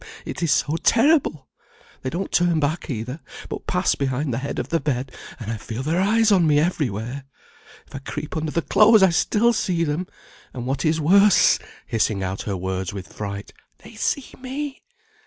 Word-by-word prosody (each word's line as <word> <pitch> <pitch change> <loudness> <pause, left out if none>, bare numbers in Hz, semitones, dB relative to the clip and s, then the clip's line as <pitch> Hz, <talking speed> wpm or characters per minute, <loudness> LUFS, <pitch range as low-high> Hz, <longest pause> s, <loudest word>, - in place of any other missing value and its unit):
it - - -6
is 165 -3 +1
so 155 +2 +1
terrible! 230 - +2 0.5
They 130 - -3
don't 180 +7 -4
turn 175 -2 +2
back 155 +4 -1
either, 125 +3 -4 0.3
but - - -6
pass - - +2
behind 135 0 -1
the 115 - -1
head 140 - -4
of - - -3
the 165 - +1
bed, 130 -4 -2 0.3
and 115 -2 -5
I 115 - -3
feel 115 +4 -6
their 165 +5 +1
eyes 220 +2 +3
on 180 -5 +4
me 145 -1 +4
everywhere. 135 - -2 0.6
If - - -22
I 135 - -5
creep 150 +2 -6
under 160 0 -2
the 170 - -1
clothes 215 -1 +6
I 190 - +6
still 225 +7 +2
see 175 -6 0
them; 165 +4 -2 0.5
and 125 -1 -5
what 135 +5 -2
is 160 +1 +2
worse," 195 +6 +5 0.3
hissing 110 -3 0
out 95 +1 -3
her 100 - -1
words 95 0 -3
with 95 -2 -8
fright, 100 -1 -6 0.3
"they - - -12
see 280 -3 -2
me. 270 +2 -5
150 Hz, 190 wpm, -23 LUFS, 125-185 Hz, 0.6 s, clothes